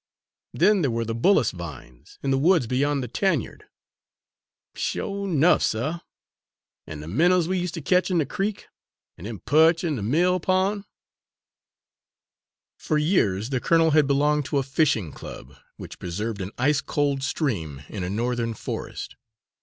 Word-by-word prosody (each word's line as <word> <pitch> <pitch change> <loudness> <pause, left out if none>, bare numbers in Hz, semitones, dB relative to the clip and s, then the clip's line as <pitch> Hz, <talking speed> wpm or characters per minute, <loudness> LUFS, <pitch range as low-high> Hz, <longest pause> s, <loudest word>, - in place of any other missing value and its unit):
Then 195 +3 +3
there 140 - +1
were 115 0 -1
the 115 - -3
bullace 120 - +3
vines, 75 -8 -10
in 135 - 0
the 135 - +3
woods 165 -2 +4
beyond 140 +3 0
the - - -4
tanyard!" 160 - -1 1.1
"Sho' 200 0 -3
'nuff, 170 -1 +3
suh! 145 +10 -1 0.9
an' 75 -1 -7
de 75 - -9
minnows 170 - +3
we 185 0 0
use' 180 -1 -2
ter 165 - -6
ketch 180 +6 +2
in 180 - +1
de 155 - +2
creek, 205 +6 -3 0.5
an' 85 - -11
dem 110 -3 -7
perch 160 +4 +4
in 155 -5 -1
de - - -4
mill 175 - +2
pon'?" 190 +3 0 1.9
For 155 - 0
years 125 - +1
the 130 - 0
colonel 165 +3 +3
had 150 -2 +4
belonged 145 +1 +2
to 140 +1 -1
a 135 - +1
fishing 130 - +1
club, - - -10 0.2
which - - -10
preserved 105 +4 -4
an 95 - -4
ice 140 +3 +2
cold 145 -2 -1
stream 95 - -2
in 100 -4 -5
a 90 - -3
Northern 115 +2 -1
forest. - - -6
140 Hz, 160 wpm, -24 LUFS, 115-170 Hz, 1.9 s, woods